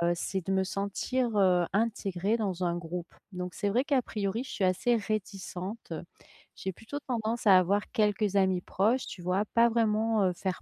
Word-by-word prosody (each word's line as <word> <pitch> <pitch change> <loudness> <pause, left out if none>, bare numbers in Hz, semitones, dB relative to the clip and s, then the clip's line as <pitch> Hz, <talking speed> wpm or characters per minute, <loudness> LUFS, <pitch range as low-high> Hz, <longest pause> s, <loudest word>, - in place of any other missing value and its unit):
c'est 190 +2 -2
de 195 - -1
me 190 0 +2
sentir, 210 +5 -1
heu, 180 -3 +4
intégrée 205 -1 0
dans 190 -4 -2
un 175 -1 0
groupe. 175 0 -6 0.2
Donc, 180 -1 -5
c'est 205 - -1
vrai, 240 +6 +2
qu'a 280 -3 +2
priori, 210 0 -2
je 265 - -11
suis 195 - -2
assez 185 +6 +2
réticente. 200 -2 -4 0.6
J'ai 190 - -4
plutôt 225 +10 -7
tendance 230 -2 -1
à 190 -2 +9
avoir 195 +3 +3
quelques 210 -3 +1
amis 190 -2 +3
proches, 225 +10 +1
tu 185 - -8
vois, 180 +3 +1
pas 235 0 +5
vraiment, 220 -1 +2
heu, 185 -1 +2
faire 185 +1 -3
200 Hz, 180 wpm, -29 LUFS, 185-225 Hz, 0.6 s, à